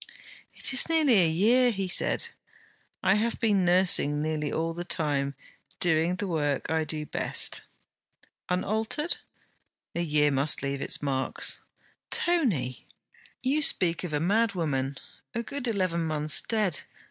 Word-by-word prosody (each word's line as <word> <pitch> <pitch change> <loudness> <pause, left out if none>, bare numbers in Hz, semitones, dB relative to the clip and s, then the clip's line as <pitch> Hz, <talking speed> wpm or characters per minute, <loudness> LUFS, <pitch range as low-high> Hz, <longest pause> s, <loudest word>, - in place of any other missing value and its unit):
'It - - 0
is 265 - +6
nearly 295 - +4
a 165 - +4
year!' 230 +10 +3
he 195 -4 -2
said. 180 - +3 0.7
'I 190 0 +4
have 225 +3 -1
been 205 -4 +2
nursing 175 -5 +3
nearly 150 -1 -2
all 165 +1 -2
the 175 +1 -5
time, 145 -5 -1 0.4
doing 165 +1 +2
the 200 - -4
work 150 -7 -2
I 160 -1 0
do 155 0 -3
best.' - - -1 0.9
'Unaltered?' 220 - -1 0.8
'A 170 - -2
year 150 -3 +2
must 140 +2 +2
leave 140 0 -3
its - - -3
marks.' 135 -2 -1 0.5
'Tony!' 205 - 0 0.6
'You 275 +4 +1
speak 175 - +1
of 175 - -5
a 150 - 0
madwoman, 165 -9 0 0.4
a 235 - -2
good 265 +1 -4
eleven 185 -6 0
months 155 -2 +2
dead. 210 -9 -1
170 Hz, 135 wpm, -27 LUFS, 150-215 Hz, 0.9 s, is